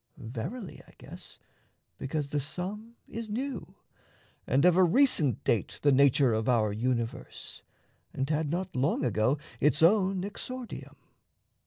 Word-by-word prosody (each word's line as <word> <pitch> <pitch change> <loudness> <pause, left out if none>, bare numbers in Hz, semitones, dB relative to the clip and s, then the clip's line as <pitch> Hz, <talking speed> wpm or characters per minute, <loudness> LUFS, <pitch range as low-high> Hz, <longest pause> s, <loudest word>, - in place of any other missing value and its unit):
Verily, 135 - -6
I - - -18
guess, - - -11 0.6
because 140 +1 -3
The 145 - -1
Sum 200 - -5
is 230 -1 -6
new, 260 +6 -4 0.7
and 140 +5 +3
of 180 -1 +6
a 185 - +6
recent 170 - +3
date 110 -5 0
The 145 - +5
nature 135 -2 +4
of 110 +2 0
our 110 -4 +2
universe, 115 +1 -3 0.5
and 135 - -2
had 155 0 0
Not 175 +4 -3
long 135 +2 +1
ago 115 +4 +1 0.2
its 150 +1 +3
own 190 0 +4
exordium. 245 +4 -7
150 Hz, 135 wpm, -29 LUFS, 130-195 Hz, 0.7 s, of